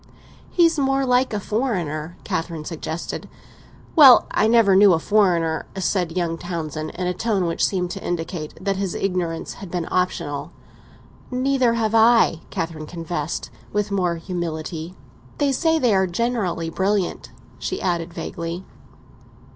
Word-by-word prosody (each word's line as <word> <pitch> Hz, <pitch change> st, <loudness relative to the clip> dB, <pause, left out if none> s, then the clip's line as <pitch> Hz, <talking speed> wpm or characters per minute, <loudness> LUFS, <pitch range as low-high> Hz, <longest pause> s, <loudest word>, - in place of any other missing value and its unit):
"He's 335 Hz, -3 st, +3 dB
more 270 Hz, 0 st, +2 dB
like 250 Hz, +1 st, +2 dB
a 210 Hz, -, -1 dB
foreigner," 175 Hz, -, -2 dB
Catherine 165 Hz, -2 st, -3 dB
suggested. 165 Hz, 0 st, -5 dB, 0.7 s
"Well, 275 Hz, -6 st, +9 dB
I 215 Hz, -, +3 dB
never 225 Hz, -4 st, +5 dB
knew 195 Hz, -1 st, +7 dB
a -, -, +3 dB
foreigner!" 170 Hz, -5 st, +2 dB
said 180 Hz, -2 st, -1 dB
young 165 Hz, -2 st, -1 dB
Townsend, 155 Hz, -3 st, -4 dB
in 180 Hz, -, -3 dB
a 180 Hz, -, 0 dB
tone 200 Hz, -2 st, 0 dB
which 165 Hz, -1 st, -1 dB
seemed 180 Hz, -2 st, 0 dB
to -, -, -6 dB
indicate 165 Hz, -2 st, -4 dB
that 195 Hz, 0 st, -1 dB
his 195 Hz, -2 st, -2 dB
ignorance 180 Hz, -4 st, -2 dB
had 195 Hz, -, -7 dB
been 175 Hz, -2 st, -3 dB
optional. 180 Hz, -5 st, -1 dB, 0.8 s
"Neither 255 Hz, -2 st, +2 dB
have 220 Hz, -2 st, 0 dB
I," 225 Hz, -7 st, +5 dB
Catherine 165 Hz, -2 st, -4 dB
confessed, 165 Hz, -2 st, -4 dB, 0.2 s
with 210 Hz, 0 st, -1 dB
more 180 Hz, -3 st, +1 dB
humility. 165 Hz, -1 st, -5 dB, 0.4 s
"They 285 Hz, -1 st, +2 dB
say 320 Hz, +4 st, +2 dB
they 245 Hz, -8 st, +3 dB
are 190 Hz, -1 st, +3 dB
generally 180 Hz, -5 st, -1 dB
brilliant," 195 Hz, +1 st, -1 dB, 0.3 s
she 375 Hz, -, -3 dB
added 170 Hz, -2 st, -1 dB
vaguely. 170 Hz, +1 st, -5 dB
180 Hz, 140 wpm, -22 LUFS, 165-220 Hz, 0.8 s, Well